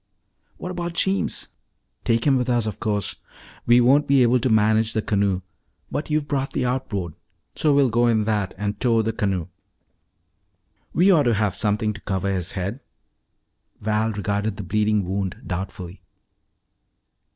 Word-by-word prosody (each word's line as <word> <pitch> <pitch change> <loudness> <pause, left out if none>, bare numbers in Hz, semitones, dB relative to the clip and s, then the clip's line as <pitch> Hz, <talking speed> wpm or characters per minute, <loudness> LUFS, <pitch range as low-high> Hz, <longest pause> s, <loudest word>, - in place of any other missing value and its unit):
"What 180 - -6
about 175 -1 -4
Jeems?" 195 +2 0 0.6
"Take 115 0 +1
him 140 -2 +4
with 125 -1 0
us, 120 -2 +2
of 110 -3 -4
course. 105 -3 -1 0.5
We 120 +1 +6
won't 135 +5 +4
be 135 -2 +5
able 125 +1 +3
to 125 - 0
manage 110 0 +3
the 110 - 0
canoe. 100 -4 0 0.5
But 145 - -3
you 155 0 +2
brought 140 -2 -3
the - - 0
outboard, 110 -9 -2 0.4
so 155 - +1
we'll 140 -3 +3
go 120 +2 +3
in 110 -2 +2
that 105 -3 -1
and 105 +1 -3
tow 115 -3 +2
the 110 +1 -1
canoe. 95 -6 -1 1.5
We 185 +3 +4
ought 155 -6 +4
to 115 - +2
have 105 -2 0
something 105 +2 +1
to 105 - -11
cover 100 0 -1
his 90 -1 -2
head." 100 +6 -3 1.0
Val 110 +1 0
regarded 100 0 -2
the 105 - -5
bleeding 105 +1 +1
wound 95 0 -3
doubtfully. 90 0 -6
110 Hz, 160 wpm, -23 LUFS, 100-125 Hz, 1.5 s, We